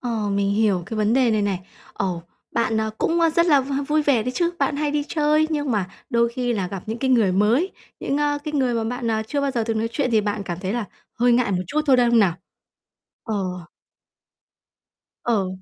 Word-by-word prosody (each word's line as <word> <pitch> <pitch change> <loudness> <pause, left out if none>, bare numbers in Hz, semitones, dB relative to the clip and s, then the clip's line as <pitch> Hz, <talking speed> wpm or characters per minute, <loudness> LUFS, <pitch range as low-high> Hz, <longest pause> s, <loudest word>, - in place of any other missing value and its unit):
Ờ, 225 -4 -2
mình 200 0 +1
hiểu 205 -4 +2
cái 220 - -5
vấn 215 0 +2
đề 255 -2 +3
này 215 -1 +1
này. 195 -3 -1 0.3
Ồ, 175 -3 -2 0.3
bạn, 225 -1 0
ờ, 220 0 0
cũng, 335 +1 +1
ơ, 330 -1 +4
rất 340 +2 +2
là 290 -5 +5
v 270 +1 -5 0.2
vui 305 0 +2
vẻ 275 -6 +2
đấy 250 +3 -3
chứ, 345 -1 +1
bạn 290 - 0
hay 295 0 0
đi 295 0 0
chơi, 305 0 +2
nhưng 295 -3 -1
mà 205 -5 0 0.2
đôi 235 -2 +3
khi 245 +1 -2
là 200 -5 -1
gặp 190 -1 -6
những 220 +2 -4
cái 265 +2 0
người 225 -7 +4
mới, 225 - +2 0.3
những, 275 - -1
ơ, 290 0 +1
cái 300 - -4
người 260 -4 +1
mà 225 -1 -1
bạn, 245 -2 -3
ờ, 220 -1 0
chưa 285 +4 -1
bao 280 -1 0
giờ 235 -4 -1
từng 225 -1 -1
nói 225 +1 -1
chuyện 265 -2 0
thì 220 -2 +4
bạn 205 0 -2
cảm 175 -3 -5
thấy 190 +1 -2
là 235 -1 -2 0.3
hơi 245 +1 +3
ngại 235 -3 +2
một 180 -2 0
chút 305 +2 0
thôi, 270 -3 +5
đúng 240 -1 +3
không 235 - +5
nào? 190 -6 +3 0.9
Ờ. 185 -5 -3 1.6
Ờ. 210 -6 +1
235 Hz, 240 wpm, -22 LUFS, 210-280 Hz, 1.6 s, là